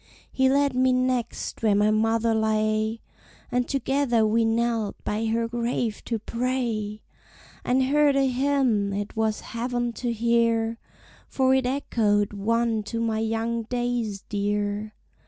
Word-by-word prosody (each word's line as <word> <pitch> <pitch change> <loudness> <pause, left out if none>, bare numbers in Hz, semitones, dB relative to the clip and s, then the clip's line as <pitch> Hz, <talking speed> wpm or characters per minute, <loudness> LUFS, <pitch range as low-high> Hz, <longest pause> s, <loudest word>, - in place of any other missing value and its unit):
He 265 0 +2
led 280 0 +2
me 255 0 +3
next 255 -2 -1
where 215 -3 +3
my 210 +1 +3
mother 225 +1 +2
lay, 220 0 0 0.5
And 245 0 0
together 265 -4 +1
we 225 +2 +2
knelt 225 -2 0
by 215 +2 -1
her 230 +1 0
grave 235 -1 -2
to 230 - -1
pray, 230 -3 -2 0.6
And 260 +1 +2
heard 290 +1 +3
a 275 -1 +3
hymn 255 -6 +1
it 205 +1 -4
was 220 -1 0
heaven 240 0 -3
to 245 -2 0
hear, 230 0 +1 0.5
For 260 -1 +2
it 265 -1 +2
echoed 210 -6 +1
one 225 +2 0
to 230 +2 -4
my 225 -1 0
young 225 +1 -1
days 240 -4 -2
dear. 205 +1 -2
230 Hz, 135 wpm, -25 LUFS, 215-250 Hz, 0.6 s, me